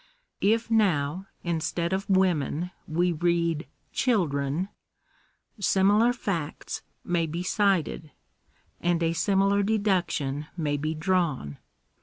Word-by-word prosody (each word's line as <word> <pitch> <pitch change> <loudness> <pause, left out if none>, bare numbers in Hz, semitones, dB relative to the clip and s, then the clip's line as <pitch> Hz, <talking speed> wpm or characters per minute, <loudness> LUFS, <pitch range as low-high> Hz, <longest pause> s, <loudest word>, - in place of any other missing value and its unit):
If 225 +3 +2
now, 185 -5 +2 0.2
instead 170 +1 -1
of 195 +2 -2
women 180 -3 +1 0.2
we 175 +3 +1
read 170 -1 0 0.3
children, 170 - +1 0.9
similar 205 +4 +4
facts 180 - -4 0.2
may 170 -2 0
be 170 +3 -3
cited, 185 -5 +1 0.7
and 170 -1 +1
a 165 0 +2
similar 195 +2 +2
deduction 185 -9 0
may 150 -3 0
be 155 +2 -2
drawn. 155 - 0
175 Hz, 100 wpm, -27 LUFS, 155-195 Hz, 0.9 s, similar